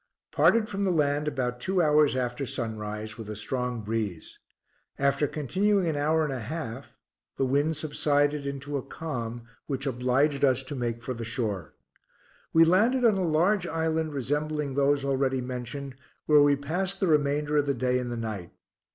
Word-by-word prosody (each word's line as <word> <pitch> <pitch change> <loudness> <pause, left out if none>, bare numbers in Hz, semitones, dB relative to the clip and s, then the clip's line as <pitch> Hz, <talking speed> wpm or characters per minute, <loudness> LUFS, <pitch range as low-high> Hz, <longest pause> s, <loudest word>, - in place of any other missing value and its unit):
Parted 225 -1 +4
from 200 -1 -3
the 195 - +2
land 150 -3 +1
about 125 -4 -2
two 190 +7 0
hours 150 -4 +4
after 125 +1 -2
sunrise, 110 -3 -5
with 110 -2 -7
a 105 - -4
strong 125 +2 -3
breeze. 105 -6 -4 0.6
After 140 +1 +2
continuing 190 - +1
an 160 - 0
hour 155 +2 +2
and 150 -3 -2
a 130 - -4
half 130 0 -6 0.4
the 135 - +1
wind 145 +4 +1
subsided 145 -1 +1
into 140 +1 -4
a - - -2
calm, 120 -7 -5 0.2
which 135 -1 -3
obliged 135 +3 +1
us 135 -1 +4
to 135 +2 -5
make 120 -2 -3
for 130 - -3
the 115 -1 -6
shore. 110 - -3 0.8
We 165 0 +6
landed 230 +9 +3
on 225 - +6
a 190 -1 0
large 175 +4 +2
island 160 -1 -1
resembling 150 +2 -1
those 140 0 +2
already 135 -1 +1
mentioned, 125 +2 -5 0.3
where 150 -1 +6
we 145 0 +5
passed 180 +7 -2
the - - +2
remainder 150 -2 +2
of 145 -1 +2
the 140 - +1
day 125 +1 +1
and 125 -1 -4
the 120 - -3
night. 110 -6 -5
140 Hz, 175 wpm, -27 LUFS, 125-155 Hz, 0.8 s, We